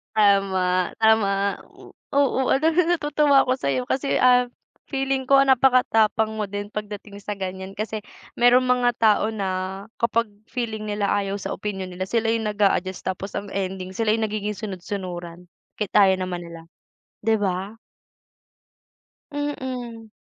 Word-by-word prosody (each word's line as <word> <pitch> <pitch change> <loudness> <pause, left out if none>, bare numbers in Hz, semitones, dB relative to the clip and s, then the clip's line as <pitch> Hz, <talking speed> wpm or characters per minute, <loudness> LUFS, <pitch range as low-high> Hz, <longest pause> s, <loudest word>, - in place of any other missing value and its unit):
Tama, 190 -3 +2
tama, 220 -2 +4 0.8
oo. 280 -2 +2
Alam 315 +5 +3
mo - - +3
na 350 - +3
natutuwa 295 -3 +3
ako 255 - +1
sayo, 135 - 0
ah, - - -17
kasi 275 +1 -1 0.8
feeling 270 -1 -1
ko 275 0 +6
napakatapang 245 -5 +3
mo 215 -1 -3
din 205 +1 -6
pagdating 205 -1 -7
sa 205 0 -5
ganyan 190 0 -6
kasi 215 +1 -3 0.4
merong 245 +1 +6
mga 250 -1 +3
tao 215 -1 +3
na 215 -3 -3 0.5
kapag 230 -1 +1 0.2
feeling 220 -3 -4
nila 205 -1 -1
ayaw 200 -1 0
sa 200 - -5
opinyon 190 -2 -4
nila, 185 +1 -4
sila 225 +1 +1
yung 225 -1 0
nag-aadjust 195 -3 0
tapos 190 +1 -4
ang 200 - -5
ending 190 -1 -4
sila 215 +2 +1
yung 225 - -1
nagiging 210 -1 -2
sunod-sunuran 180 -3 -6 0.3
kahit 210 -3 -3
ayaw 190 -2 +4
naman 180 -1 -4
nila, 170 -1 -10 0.6
di 220 0 +2
ba? 195 +2 -2 1.5
Mm. 255 -6 -5
210 Hz, 140 wpm, -23 LUFS, 195-240 Hz, 1.5 s, ko